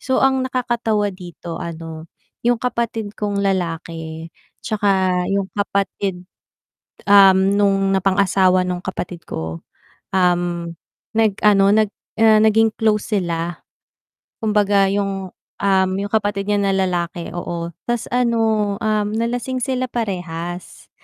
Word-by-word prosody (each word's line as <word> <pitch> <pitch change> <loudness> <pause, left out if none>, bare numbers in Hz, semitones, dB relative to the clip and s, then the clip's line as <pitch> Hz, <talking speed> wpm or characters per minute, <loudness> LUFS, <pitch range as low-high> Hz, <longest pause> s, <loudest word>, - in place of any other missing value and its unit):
So 260 - 0
ang 265 0 +3
nakakatawa 235 -5 0
dito 175 -2 -8
ano, 165 -1 -7 0.4
yung 240 0 +3
kapatid 230 -4 -2
kong 205 -1 -1
lalaki 165 -3 -3 0.3
tsaka 190 -5 +1
yung 195 -1 0
kapatid, 195 -2 -2 0.8
um, 195 -1 +6
nung 195 -1 +2
napangasawa 190 -1 +3
nung 180 -1 -2
kapatid 180 -3 -5
ko. 80 +1 -5 0.5
Um, 175 -2 +1 0.4
nag-ano 205 -2 +4
nag 215 0 +3 0.3
ah, 220 -1 +6
naging 220 0 +4
close 215 0 0
sila. 170 -1 -3 0.8
Kumbaga 205 -2 +3
yung, 195 -1 -2 0.3
um, 190 -1 +3
yung 200 - -3
kapatid 205 -2 0
niya 205 - +2
na 195 - +2
lalaki 175 -2 -1
oo, 170 -1 -4 0.2
tas 240 -1 -2
ano, 225 -4 +1
um, 215 -1 +1
nalasing 245 +3 -2
sila 255 0 -1
parehas, 175 -5 -5
195 Hz, 115 wpm, -20 LUFS, 180-215 Hz, 0.8 s, um